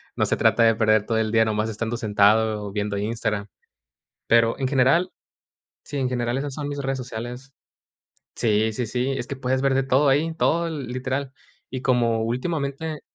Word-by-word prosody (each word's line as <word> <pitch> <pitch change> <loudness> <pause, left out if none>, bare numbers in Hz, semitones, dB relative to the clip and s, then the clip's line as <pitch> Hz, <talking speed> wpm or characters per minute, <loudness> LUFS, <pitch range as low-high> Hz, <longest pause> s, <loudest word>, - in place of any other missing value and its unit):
no - - +1
se - - 0
trata 115 - +3
de 115 -1 +5
perder 110 -1 +3
todo 115 - 0
el 110 0 0
día 115 0 +5
nomás 110 0 -1
estando 110 +2 -3
sentado 105 0 +2
o 100 - -6
viendo 100 0 -2
Instagram. 105 -1 -2 0.8
Pero, 115 0 +4
en 130 -1 0
general, 145 +7 +3 0.7
sí, - - -6
en 130 -2 0
general, 120 0 -1
esas 140 -1 -4
son 145 -1 -4
mis 145 0 -5
redes 135 0 -2
sociales. 125 +2 -7 0.8
Sí, 110 -1 +2
sí, 125 +2 -2
sí, 125 +3 -1
es - - -3
que, 140 - -4
puedes 130 0 -1
ver 135 -1 +3
de 135 - +2
todo 135 +2 +3
ahí, 150 +5 +2
todo 170 +1 +1
l 155 -4 -4
literal, 130 +2 -3 0.4
y 130 - -4
como 120 -3 +2
últimamente 140 +5 -3
125 Hz, 185 wpm, -23 LUFS, 110-135 Hz, 0.8 s, de